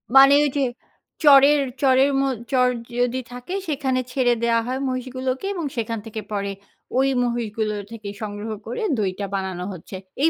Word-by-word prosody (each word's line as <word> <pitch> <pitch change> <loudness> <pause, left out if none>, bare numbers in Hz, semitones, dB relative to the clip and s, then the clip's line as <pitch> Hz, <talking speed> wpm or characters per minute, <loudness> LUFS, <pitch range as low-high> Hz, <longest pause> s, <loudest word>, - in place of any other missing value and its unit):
মানে 275 +1 +9
ঐ - - +3
যে। 280 - +2 0.6
চড়ের, 285 0 +7 0.2
চড়ের 265 +1 +4
ম - - +3 0.3
চড় 250 -1 +4 0.3
যদি 245 +1 +1
থাকে, 245 +9 -7
সেখানে 270 -4 0
ছেড়ে 250 -2 +2
দেওয়া 230 -1 +3
হয় 260 +1 -2
মহিষগুলোকে 255 +4 -3
এবং 340 -5 -3
সেখান 230 0 -2
থেকে 220 -1 -5
পরে 200 -1 -2 0.5
ঐ - - +5 0.2
মহিষগুলো 220 -3 -1 0.2
থেকে 220 -3 -7
সংগ্রহ 210 +1 -5 0.2
করে 240 - -4 0.2
দইটা 200 0 -1
বানানো 190 -2 -3
হচ্ছে। 180 +2 -10 0.3
এই 325 - +6
245 Hz, 155 wpm, -23 LUFS, 215-265 Hz, 0.6 s, মানে